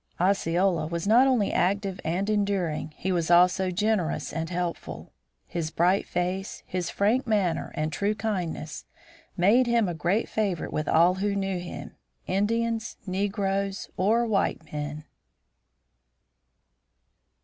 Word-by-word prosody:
Osceola 180 -2 +2
was 170 +1 -3
not 235 +6 +6
only 245 -6 +2
active 195 0 0
and 175 +5 -1
enduring. 200 -7 0
He 190 - -2
was 170 -3 0
also 180 +2 +5
generous 190 -2 0
and 165 0 -3
helpful. 175 -1 -4 0.3
His 165 -2 -3
bright 175 +4 +2
face, 180 +2 -3
his 180 -2 -3
frank 235 +6 +1
manner, 195 -7 0
and 155 0 -2
true 205 +1 0
kindness 180 -7 -3 0.5
made 220 +8 +4
him 235 -3 +3
a 175 - -2
great 175 +7 0
favorite 200 -6 -2
with 155 -1 -2
all 170 +3 +5
who 200 +2 -1
knew 195 -2 -1
him, 175 - -8 0.3
Indians, 225 +3 -1
negroes, 195 0 -2
or 225 +5 +2
white 200 -6 0
men. 150 0 -5
190 Hz, 125 wpm, -27 LUFS, 175-205 Hz, 0.5 s, not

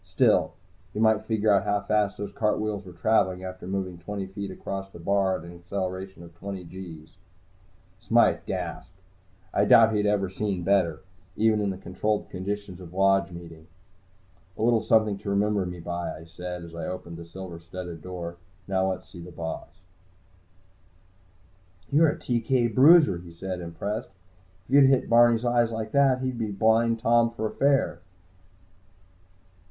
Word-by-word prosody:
Still, - - +2 0.4
you - - -2
might 110 -1 +3
figure 110 -1 +2
out 100 -1 +3
how 105 0 0
fast 105 0 0
those 100 -1 -5
cartwheels 105 -1 -1
were - - -9
traveling 95 0 +1
after 95 -1 -7
moving 95 -2 -3
twenty 100 +3 -5
feet 100 +1 -6
across 95 +1 -6
the 90 - -12
bar 95 +2 +1
at - - -11
an 85 0 -10
acceleration 95 0 -5
of 85 0 -13
twenty 95 +2 -7
gees. 85 -1 -10 0.8
Smythe - - +3
gasped. 90 +6 -5 0.5
I 100 - +3
doubted 110 +2 +7
he 110 - 0
had 105 0 +1
ever 100 -2 +1
seen 95 -1 -3
better, 85 -5 +2 0.4
even 110 -1 +3
in 100 - 0
the 95 - -4
controlled 105 +2 -2
conditions 100 0 -5
of 90 0 -11
Lodge 95 -2 +3
Meeting. 85 -2 -11 0.9
"A - - -2
little 115 -1 +3
something 110 -2 +2
to 100 - -6
remember 100 -1 +1
me 90 0 -7
by," 85 +1 -4
I 80 - -11
said, 90 +1 -7
as 85 -1 -11
I 85 - -5
opened 85 -2 -6
the 85 - -9
silver 90 -1 -8
studded 85 -1 -8
door. 85 -1 -6 0.3
"Now 95 -1 +1
let's 95 - -5
see 85 - -11
the 85 - -9
boss." 80 -1 -6 2.2
"You're 155 +2 +5
a - - -3
TK 120 -1 0
bruiser," 140 - +6
he 85 -1 -12
said, 90 +1 -5
impressed. 85 +6 -4 0.6
"If 130 - -7
you 140 - +8
hit 135 -1 +4
Barney's 120 0 +5
eyes 120 -1 +3
like 110 -1 -4
that, 135 -2 +3
he's 130 -2 -2
a 110 -2 -2
Blind 110 +3 +3
Tom 115 0 +4
for 110 -2 -3
fair." 140 -10 +1
95 Hz, 165 wpm, -26 LUFS, 90-110 Hz, 2.2 s, you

